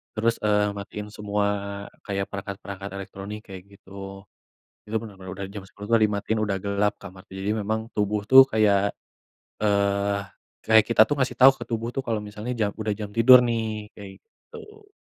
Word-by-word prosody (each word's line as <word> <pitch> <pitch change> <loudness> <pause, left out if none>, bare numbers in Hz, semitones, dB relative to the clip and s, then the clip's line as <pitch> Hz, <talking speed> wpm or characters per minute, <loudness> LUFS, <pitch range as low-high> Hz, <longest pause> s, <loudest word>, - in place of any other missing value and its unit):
Terus, 115 +1 +1
eee, 105 -1 +2
matiin 100 +1 -7
semua 105 -1 -1 0.6
kayak 100 -1 -2
perangkat-perangkat 100 0 -7
elektronik, 100 +2 -7
kayak 95 -2 -9 0.2
gitu. 100 0 -10 0.6
Itu 110 - -5
bener-bener 95 -4 -10
udah 100 - -5
jam 100 -1 -8
10.00 100 +1 -11
tuh - - +6
dah - - +4
dimatiin, 105 +1 -2
udah 105 -2 0
gelap 100 +1 +1
kamar, 95 -1 -11
tuh. 95 - -12
Jadi 100 +2 -2
memang, 110 +2 -1
tubuh 105 0 -1
tuh 130 +4 +8
kayak, 100 -3 +2 0.7
eee, 100 -1 +1 0.5
kayak 110 -1 +6
kita 115 - +4
tuh, 145 - 0
ngasih 130 -2 -1
tahu 135 +1 +9
ke - - -7
tubuh 115 0 -3
tuh, 135 - -2
kalau 115 -3 -1
misalnya 105 +3 -6
jam 105 -2 +1
udah 110 -1 -3
jam 105 0 -6
tidur 125 +2 +9
nih, 110 -3 -2
kayak 100 -2 -9
gitu. 430 - -16
105 Hz, 175 wpm, -25 LUFS, 100-110 Hz, 0.7 s, tahu